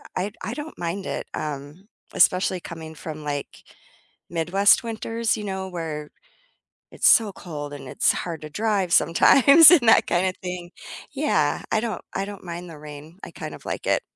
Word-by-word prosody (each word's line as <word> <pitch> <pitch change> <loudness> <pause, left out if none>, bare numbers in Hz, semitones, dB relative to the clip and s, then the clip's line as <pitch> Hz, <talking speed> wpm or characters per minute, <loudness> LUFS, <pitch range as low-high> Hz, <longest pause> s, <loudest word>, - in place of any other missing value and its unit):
I 195 +3 -2
I 225 - -4
don't 295 +3 -8
mind 175 +3 -4
it, - - -4
um, 150 +6 -6 0.3
especially 185 -1 +3
coming 160 -2 -9
from, 155 0 -8
like, 145 -1 -5 0.7
Midwest 180 +7 +3
winters, 230 0 -2
you 210 - -6
know, 190 -1 -4
where 160 -4 -5 0.8
it's - - +1
so 220 -4 +5
cold 145 -6 -8
and 135 -2 -9
it's - - +2
hard 165 -3 -5
to 155 - -8
drive 200 -1 -1
sometimes 280 - +7
and 270 -10 +5
that 225 - +6
kinda 185 +1 +1
thing. 180 -1 -6 0.4
Yeah, - - 0
I 220 - +2
don't 220 -5 -4
I 195 - -2
don't 200 -2 -9
mind 175 0 -7
the 155 -2 -11
rain, 150 +4 -11
I - - -7
kind - - -8
of - - -16
like - - -5
it. - - +2
180 Hz, 175 wpm, -23 LUFS, 160-205 Hz, 0.8 s, sometimes